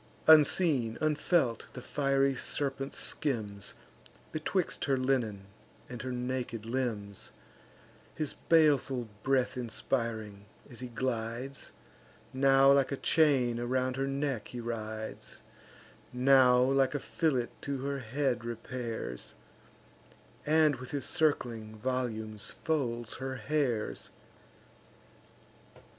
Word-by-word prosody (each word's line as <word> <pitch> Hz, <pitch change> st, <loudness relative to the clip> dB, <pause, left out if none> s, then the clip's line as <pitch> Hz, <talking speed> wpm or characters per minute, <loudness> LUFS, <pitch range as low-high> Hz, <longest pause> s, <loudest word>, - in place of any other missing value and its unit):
Unseen, 150 Hz, -6 st, +5 dB
unfelt, 150 Hz, -5 st, +1 dB
the 125 Hz, -, -7 dB
fiery 135 Hz, -1 st, +2 dB
serpent 135 Hz, +1 st, -3 dB
skims 110 Hz, -9 st, -3 dB, 0.6 s
Betwixt 170 Hz, +3 st, -1 dB
her 135 Hz, -2 st, +2 dB
linen 120 Hz, -7 st, 0 dB, 0.4 s
and 125 Hz, -1 st, -6 dB
her 130 Hz, -, -4 dB
naked 125 Hz, -2 st, -3 dB
limbs; 115 Hz, -5 st, -3 dB, 0.8 s
His 155 Hz, -3 st, -2 dB
baleful 140 Hz, -7 st, +2 dB
breath 130 Hz, +1 st, +1 dB
inspiring, 115 Hz, -4 st, -3 dB, 0.2 s
as 120 Hz, -, -11 dB
he 125 Hz, -, -5 dB
glides, 120 Hz, +2 st, -4 dB, 0.6 s
Now 135 Hz, +1 st, +5 dB
like 140 Hz, -1 st, +3 dB
a 140 Hz, -, -1 dB
chain 130 Hz, -8 st, +3 dB
around 130 Hz, +1 st, 0 dB
her 135 Hz, +1 st, -1 dB
neck 135 Hz, -4 st, -2 dB
he 125 Hz, -, -7 dB
rides, 110 Hz, -2 st, -6 dB, 0.7 s
Now 125 Hz, 0 st, +5 dB
like 135 Hz, +2 st, +3 dB
a -, -, 0 dB
fillet 135 Hz, -8 st, 0 dB
to 140 Hz, -1 st, -3 dB
her 140 Hz, 0 st, -2 dB
head 130 Hz, 0 st, -1 dB
repairs, 115 Hz, -, -5 dB, 1.1 s
And 155 Hz, -2 st, +4 dB
with 130 Hz, +1 st, -9 dB
his 140 Hz, -3 st, -3 dB
circling 115 Hz, -8 st, 0 dB
volumes 110 Hz, -3 st, -3 dB
folds 120 Hz, -7 st, -2 dB
her 130 Hz, 0 st, -4 dB
hairs. 130 Hz, -2 st, -1 dB
130 Hz, 105 wpm, -31 LUFS, 115-140 Hz, 1.1 s, Unseen